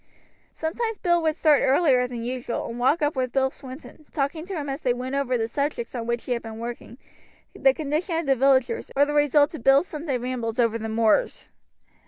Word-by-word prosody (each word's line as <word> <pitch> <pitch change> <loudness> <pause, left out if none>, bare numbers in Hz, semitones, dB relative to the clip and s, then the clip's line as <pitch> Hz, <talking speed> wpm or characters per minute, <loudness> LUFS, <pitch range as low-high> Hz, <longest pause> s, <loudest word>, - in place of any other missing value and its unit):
Sometimes 440 +7 -3
Ned 345 -1 +3
would 315 -1 +1
start 305 -3 +4
earlier 265 -3 +3
than 240 -2 -6
usual, 245 0 -3
and 230 +1 -6
walk 290 +6 +2
up 295 +1 +1
with 255 -1 -1
Bill 265 -1 +2
Swinton, 275 +3 -12
talking 305 +4 -2
to 390 - -5
him 295 -3 -4
as 275 +2 -4
they 245 -2 +1
went 255 +2 -5
over 275 -3 0
the 225 -1 -1
subjects 280 -1 -3
on 235 -2 -4
which 235 0 -1
he - - -5
had 235 -1 0
been 220 -1 -8
working, 235 0 -7 0.6
the 270 -1 +4
condition 310 +5 -2
of 330 - -2
the 270 -1 +3
villagers, 265 0 +2
or 285 +1 +5
the 295 - -3
results 295 0 +3
of 280 - -8
Bill's 275 +4 +5
Sunday 300 -6 -3
rambles 240 -2 -4
over 230 -1 +2
the 225 0 -4
moors. 225 - +1
270 Hz, 215 wpm, -24 LUFS, 245-300 Hz, 0.6 s, or